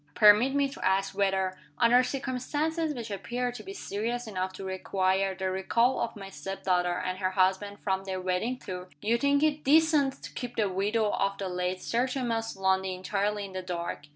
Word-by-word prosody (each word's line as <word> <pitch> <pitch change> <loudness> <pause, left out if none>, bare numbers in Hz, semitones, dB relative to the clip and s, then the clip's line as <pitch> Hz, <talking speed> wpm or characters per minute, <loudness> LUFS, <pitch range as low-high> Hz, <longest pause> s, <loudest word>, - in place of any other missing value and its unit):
Permit 215 +6 +6
me 280 -1 +3
to 275 - -9
ask 195 +1 +1
whether 190 -2 0 0.2
under 240 +2 +6
circumstances 290 +5 -2
which 230 -3 -6
appear 240 +6 -2
to 245 - -8
be 390 - -8
serious 240 - -3
enough 185 -3 -3
to 195 - -8
require 190 0 0
the 190 0 -2
recall 230 +7 +2
of 230 - -2
my 195 -2 -8
step 195 0 -7
daughter 180 -1 +2
and 185 0 -3
her 185 -1 +1
husband 190 +2 +1
from 190 -1 -1
their 190 -1 -3
wedding 185 +7 -1
tour 180 -5 -7
you 225 +3 +3
think 280 +2 +3
it 305 -1 +1
DECENT 300 -2 +3
to - - -8
keep 245 -1 -5
the 215 -2 +2
widow 205 +3 +1
of 195 0 0
the 195 - -3
late 180 0 -2
Sir 240 +3 +1
Thomas 235 -4 -2
Lundie 190 -1 +1
entirely 200 +2 -1
in 195 - -10
the 185 - -3
dark? 175 -5 -4
200 Hz, 195 wpm, -29 LUFS, 190-245 Hz, 0.2 s, Permit